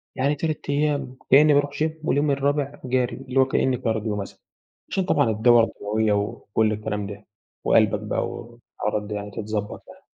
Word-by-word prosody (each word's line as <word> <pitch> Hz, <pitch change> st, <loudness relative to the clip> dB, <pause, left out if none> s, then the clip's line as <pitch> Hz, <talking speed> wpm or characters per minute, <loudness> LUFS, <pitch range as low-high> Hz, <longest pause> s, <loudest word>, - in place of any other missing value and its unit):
يعني 140 Hz, +3 st, +1 dB
3 155 Hz, +1 st, -2 dB
أيام 145 Hz, -3 st, 0 dB, 0.2 s
كإنّي 150 Hz, +2 st, +7 dB
بارُوح 145 Hz, 0 st, +2 dB
gym 160 Hz, -, +1 dB
واليوم 145 Hz, -1 st, +1 dB
الرابع 140 Hz, +1 st, -1 dB
جَري، 125 Hz, 0 st, 0 dB
اللي 135 Hz, 0 st, -2 dB
هو 130 Hz, -, +6 dB
كأن 130 Hz, -1 st, +1 dB
cardio 110 Hz, -3 st, -2 dB
مثلًا 100 Hz, -, -10 dB, 0.5 s
عشان 190 Hz, -, 0 dB
طبعًا 145 Hz, -9 st, +2 dB
الدورة 115 Hz, +2 st, +5 dB
الدمويّة 110 Hz, 0 st, -1 dB
وكلّ 105 Hz, +1 st, 0 dB
الكلام 105 Hz, -1 st, -3 dB
ده 100 Hz, +1 st, -9 dB, 0.4 s
وقلْبك -, -, +3 dB
بقى -, -, -2 dB
والحوارات 105 Hz, -3 st, -5 dB
دي 105 Hz, -, -5 dB
يعني 105 Hz, 0 st, -5 dB
تتضبَط 105 Hz, 0 st, -4 dB
يعني. -, -, -15 dB
120 Hz, 165 wpm, -24 LUFS, 105-140 Hz, 0.5 s, كإنّي